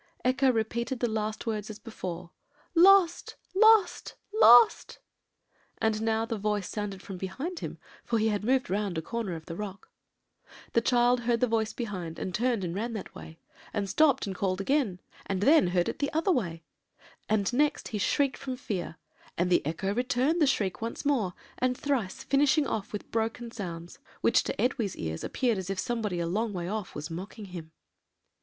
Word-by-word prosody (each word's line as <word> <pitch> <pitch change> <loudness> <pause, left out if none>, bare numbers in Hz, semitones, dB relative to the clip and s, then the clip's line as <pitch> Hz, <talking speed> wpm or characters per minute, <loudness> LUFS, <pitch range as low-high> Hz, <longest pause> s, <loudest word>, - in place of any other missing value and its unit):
Echo 260 +1 +4
repeated 235 +2 -2
the 240 - +1
last 215 0 -3
words 215 -2 -3
as 215 - -7
before, 180 -6 -7 0.4
'Lost! 360 0 +5 0.2
lost! 435 -1 +4 0.2
lost!' 245 - +6 0.8
and 220 -1 0
now 225 0 +1
the 225 -2 -4
voice 210 -2 -1
sounded 200 -3 -5
from 195 - -7
behind 270 - -5
him, - - -6 0.3
for 230 - 0
he 220 0 +2
had 205 -1 -1
moved 260 +3 +2
round 195 -2 -1
a - - -1
corner 225 -3 -3
of 160 -1 -10
a 165 - -5
rock. 195 +1 -7 0.8
"The 230 - +4
child 245 +1 +3
heard 235 0 +1
the 250 - +4
voice 225 -2 0
behind, 185 -9 -5
and 185 - -4
turned 235 0 0
and 170 -2 -3
ran 230 +5 -3
that 215 - -6
way; 160 - -11 0.4
and 200 -2 -1
stopped 270 - +3
and 195 -2 -4
called 185 0 -1
again, 210 -5 0 0.3
and 195 -1 -1
then 290 - +5
heard 175 0 +1
it - - -4
the 285 - -1
other 325 +5 +2
way; 170 - -1 0.7
and 210 0 +1
next 295 +3 +1
he 210 - -3
shrieked 275 +6 +1
from 265 -2 -5
fear, 195 - -4 0.4
and 180 +1 +2
echo 170 +6 -2
returned 255 +7 +1
the 300 - +5
shriek 200 -8 0
once 230 +5 -5
more, 230 -11 +1 0.2
and 250 0 +1
thrice, 255 -10 -2
finishing 285 +2 +3
off 215 -5 -3
with 210 - -7
broken 230 +1 -2
sounds, 175 -6 -7 0.2
which - - +4
to - - -4
Edwy's 230 -5 0
ears 80 0 -4
appeared 235 -6 0
as 190 0 -6
if 195 - -2
somebody 215 -5 -2
a 170 - -1
long 210 +5 -1
way 175 -2 -4
off 210 -1 -4
was 150 +3 -6
mocking 190 +5 -7
him. 170 -4 -9
220 Hz, 185 wpm, -28 LUFS, 190-250 Hz, 0.8 s, lost